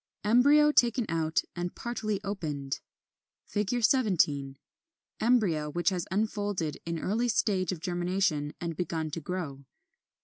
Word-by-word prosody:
Embryo 285 Hz, +7 st, +5 dB
taken 240 Hz, -3 st, +3 dB
out 160 Hz, -1 st, +1 dB
and 175 Hz, 0 st, -4 dB
partly 215 Hz, -4 st, -3 dB
opened. 150 Hz, -9 st, -3 dB, 0.7 s
17. 200 Hz, -, +1 dB, 0.6 s
Embryo 200 Hz, -11 st, +2 dB
which 175 Hz, +5 st, +1 dB
has 180 Hz, -3 st, -3 dB
unfolded 205 Hz, -5 st, -1 dB
in 170 Hz, 0 st, -2 dB
early 220 Hz, +9 st, 0 dB
stage 195 Hz, -6 st, +1 dB
of 180 Hz, -, -4 dB
germination 175 Hz, -4 st, 0 dB
and 170 Hz, -1 st, -4 dB
begun 160 Hz, -2 st, -2 dB
to 165 Hz, -, -4 dB
grow. 150 Hz, -5 st, -5 dB
185 Hz, 115 wpm, -29 LUFS, 160-215 Hz, 0.7 s, Embryo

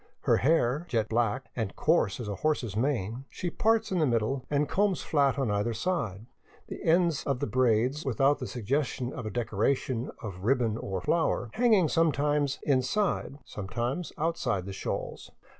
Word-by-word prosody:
Her -, -, +3 dB
hair, 145 Hz, -, +2 dB
jet 110 Hz, -3 st, 0 dB
black, 115 Hz, +2 st, 0 dB
and 110 Hz, -5 st, -3 dB
coarse 150 Hz, -, +2 dB
as 120 Hz, -, -5 dB
a 100 Hz, -2 st, -4 dB
horse's 130 Hz, -10 st, -1 dB
mane, 120 Hz, 0 st, -1 dB
she 175 Hz, -, -4 dB
parts 225 Hz, +2 st, +1 dB
in 185 Hz, -, +1 dB
the 155 Hz, -, +3 dB
middle 120 Hz, +2 st, 0 dB
and 150 Hz, 0 st, +1 dB
combs 200 Hz, -2 st, +1 dB
flat 140 Hz, -3 st, +2 dB
on 135 Hz, -6 st, 0 dB
either 105 Hz, +3 st, 0 dB
side, 115 Hz, -, -2 dB, 0.4 s
the -, -, -7 dB
ends 165 Hz, -2 st, +3 dB
of 135 Hz, -3 st, 0 dB
the -, -, 0 dB
braids, 125 Hz, +3 st, +2 dB
without 135 Hz, +2 st, +2 dB
the 130 Hz, -, -4 dB
suggestion 125 Hz, +1 st, -2 dB
of 120 Hz, -, -5 dB
a -, -, -2 dB
decoration 120 Hz, +3 st, -1 dB
of 100 Hz, -5 st, -6 dB
ribbon 115 Hz, -2 st, +2 dB
or 95 Hz, -5 st, -4 dB
flower, 120 Hz, -, 0 dB
hanging 220 Hz, -8 st, +4 dB
sometimes 150 Hz, -3 st, +1 dB
in 135 Hz, -3 st, +3 dB
side, 180 Hz, -1 st, -1 dB
sometimes 120 Hz, -, -3 dB
outside 135 Hz, -, -1 dB
the 100 Hz, -, -6 dB
shawls. -, -, -5 dB
130 Hz, 170 wpm, -29 LUFS, 115-155 Hz, 0.4 s, hanging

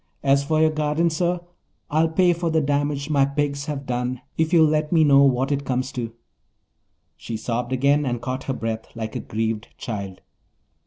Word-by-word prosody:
As 140 Hz, 0 st, +3 dB
for 155 Hz, +2 st, +1 dB
your 160 Hz, 0 st, +4 dB
garden, 155 Hz, +2 st, +1 dB
sir. 175 Hz, +2 st, 0 dB, 0.5 s
I'll 160 Hz, +2 st, +3 dB
pay 175 Hz, +2 st, +3 dB
for 170 Hz, 0 st, -2 dB
the 160 Hz, 0 st, +2 dB
damage 145 Hz, 0 st, -1 dB
my 140 Hz, -2 st, +4 dB
pigs 140 Hz, 0 st, -1 dB
have 140 Hz, -2 st, -4 dB
done 125 Hz, 0 st, -2 dB
if 160 Hz, 0 st, 0 dB
you'll 165 Hz, -3 st, +6 dB
let 155 Hz, 0 st, +1 dB
me 165 Hz, -3 st, +5 dB
know 140 Hz, -2 st, +6 dB
what 135 Hz, 0 st, +3 dB
it 140 Hz, 0 st, 0 dB
comes 130 Hz, 0 st, -2 dB
to." 115 Hz, -2 st, -4 dB, 1.1 s
She 115 Hz, -, -5 dB
sobbed 120 Hz, +2 st, -3 dB
again 140 Hz, +3 st, +3 dB
and 120 Hz, -3 st, -1 dB
caught 130 Hz, +2 st, -4 dB
her 135 Hz, -, -1 dB
breath 115 Hz, -1 st, -4 dB
like 110 Hz, -1 st, -5 dB
a -, -, -1 dB
grieved 110 Hz, 0 st, -3 dB
child. 100 Hz, -5 st, -6 dB
140 Hz, 190 wpm, -23 LUFS, 125-155 Hz, 1.1 s, you'll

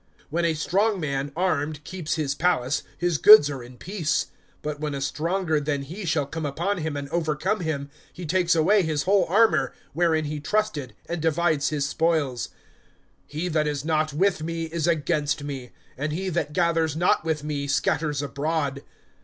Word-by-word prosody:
(21)When 170 Hz, +1 st, +1 dB
a 165 Hz, -1 st, +1 dB
strong 200 Hz, +6 st, +1 dB
man 140 Hz, -2 st, -2 dB
armed 155 Hz, -4 st, -1 dB
keeps 160 Hz, -2 st, -3 dB
his 150 Hz, -3 st, -1 dB
palace, 140 Hz, -5 st, +1 dB, 0.2 s
his 175 Hz, -4 st, 0 dB
goods 210 Hz, -9 st, +9 dB
are 135 Hz, -3 st, -5 dB
in 120 Hz, +1 st, -12 dB
peace. 175 Hz, -2 st, -1 dB, 0.3 s
(22)But 150 Hz, -1 st, -4 dB
when 150 Hz, -1 st, -3 dB
a -, -, -3 dB
stronger 160 Hz, +3 st, 0 dB
than 145 Hz, -1 st, -2 dB
he 180 Hz, +8 st, -7 dB
shall 155 Hz, -3 st, +1 dB
come 160 Hz, +3 st, -5 dB
upon 170 Hz, +7 st, -1 dB
him 155 Hz, -2 st, -3 dB
and 140 Hz, 0 st, -4 dB
overcome 165 Hz, +5 st, 0 dB
him, 145 Hz, -4 st, -3 dB, 0.2 s
he 180 Hz, -, -8 dB
takes 175 Hz, +1 st, +2 dB
away 185 Hz, +6 st, +4 dB
his 155 Hz, -4 st, -1 dB
whole 195 Hz, 0 st, +3 dB
armor, 220 Hz, +5 st, +3 dB, 0.2 s
wherein 160 Hz, -1 st, +2 dB
he 150 Hz, 0 st, -3 dB
trusted, 155 Hz, -, -1 dB
and 170 Hz, -1 st, -3 dB
divides 160 Hz, -2 st, +1 dB
his 145 Hz, -2 st, -1 dB
spoils. 150 Hz, -6 st, 0 dB, 0.8 s
(23)He 165 Hz, +4 st, -2 dB
that 155 Hz, -1 st, +1 dB
is 145 Hz, -1 st, -2 dB
not 155 Hz, -1 st, +1 dB
with 175 Hz, +3 st, +1 dB
me 165 Hz, +1 st, -3 dB
is 165 Hz, 0 st, -2 dB
against 150 Hz, -3 st, 0 dB
me; 135 Hz, -4 st, -6 dB, 0.3 s
and 150 Hz, +3 st, -3 dB
he 190 Hz, +4 st, -2 dB
that 160 Hz, -4 st, -1 dB
gathers 165 Hz, -2 st, +1 dB
not 175 Hz, 0 st, +2 dB
with 160 Hz, -2 st, -1 dB
me 145 Hz, -2 st, -3 dB
scatters 145 Hz, +1 st, 0 dB
abroad. 145 Hz, -1 st, -2 dB
155 Hz, 180 wpm, -25 LUFS, 145-170 Hz, 0.8 s, goods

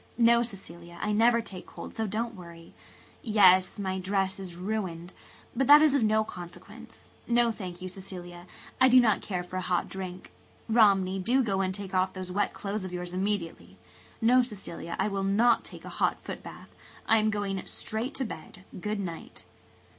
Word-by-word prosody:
No, 235 Hz, 0 st, +5 dB
Cecilia, 175 Hz, -6 st, -8 dB
I 210 Hz, -, -1 dB
never 230 Hz, +2 st, +4 dB
take 185 Hz, -5 st, -10 dB
cold, -, -, -9 dB
so 220 Hz, -1 st, -1 dB
don't 230 Hz, +4 st, -2 dB
worry. 170 Hz, -4 st, -12 dB, 0.5 s
Yes, 190 Hz, -5 st, +5 dB
my 190 Hz, -2 st, -2 dB
dress 190 Hz, +1 st, -1 dB
is 185 Hz, -3 st, -7 dB
ruined, 185 Hz, -2 st, -4 dB, 0.4 s
but 270 Hz, -, +1 dB
that 295 Hz, +1 st, +9 dB
is 305 Hz, -3 st, +4 dB
of 280 Hz, -, +3 dB
no 220 Hz, 0 st, +3 dB
consequence. 175 Hz, -4 st, -11 dB, 0.2 s
No, 235 Hz, 0 st, +3 dB
thank 180 Hz, -4 st, -8 dB
you, -, -, -4 dB
Cecilia, 180 Hz, -2 st, -7 dB, 0.3 s
I 260 Hz, -, +7 dB
do 255 Hz, +1 st, +8 dB
not 225 Hz, -4 st, +3 dB
care 180 Hz, -3 st, -3 dB
for 180 Hz, +1 st, -6 dB
a -, -, -1 dB
hot 180 Hz, -1 st, 0 dB
drink. 185 Hz, -1 st, -7 dB, 0.4 s
Romney, 195 Hz, -4 st, +4 dB
do 245 Hz, +8 st, +2 dB
go 195 Hz, -4 st, 0 dB
and 190 Hz, -1 st, 0 dB
take 195 Hz, 0 st, -7 dB
off 185 Hz, 0 st, +1 dB
those 185 Hz, -1 st, -6 dB
wet 205 Hz, +3 st, 0 dB
clothes 205 Hz, 0 st, -4 dB
of 185 Hz, -, -5 dB
yours 180 Hz, 0 st, -5 dB
immediately. 190 Hz, -3 st, -3 dB, 0.4 s
No, 250 Hz, +2 st, +5 dB
Cecilia, 205 Hz, -7 st, -5 dB
I 195 Hz, -, +1 dB
will 195 Hz, -2 st, -2 dB
not 220 Hz, +5 st, +3 dB
take -, -, -10 dB
a -, -, -7 dB
hot -, -, 0 dB
footbath. -, -, -9 dB, 0.4 s
I 225 Hz, -, +5 dB
am 215 Hz, 0 st, +2 dB
going 200 Hz, -3 st, -2 dB
straight 230 Hz, +6 st, -4 dB
to 265 Hz, -, -1 dB
bed. 180 Hz, -2 st, -9 dB, 0.2 s
Good 210 Hz, +1 st, -2 dB
night." 170 Hz, -4 st, -7 dB
195 Hz, 185 wpm, -28 LUFS, 185-220 Hz, 0.5 s, that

